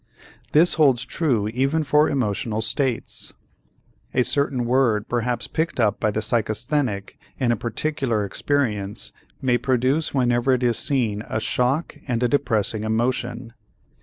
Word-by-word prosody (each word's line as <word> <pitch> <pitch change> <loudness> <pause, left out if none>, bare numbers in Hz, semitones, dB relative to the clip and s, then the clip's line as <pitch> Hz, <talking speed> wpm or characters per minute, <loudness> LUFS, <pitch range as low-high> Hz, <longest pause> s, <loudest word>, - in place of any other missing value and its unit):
This 165 +4 +5
holds 130 -4 +4
true 125 -7 0
even 135 +7 0
for 150 +2 +3
emotional 110 -4 -1
states. 120 +2 -2 0.8
A 125 - +4
certain 140 -2 0
word 120 -4 +2
perhaps 120 0 -1
picked 160 -3 -2
up 110 -3 +2
by 110 - +1
the 105 +1 -2
psychasthenic 110 -1 -1 0.2
in 125 -3 +1
a - - +2
particular 120 -1 -1
experience 105 -3 -1 0.3
may 125 -2 +2
produce 130 +4 +1
whenever 125 -1 +2
it 125 0 0
is 120 -2 +2
seen 115 -7 0
a 110 - -1
shock 125 +8 0
and 120 -2 -1
a - - +4
depressing 110 -5 +1
emotion. 120 +1 -2
120 Hz, 135 wpm, -23 LUFS, 110-135 Hz, 0.8 s, This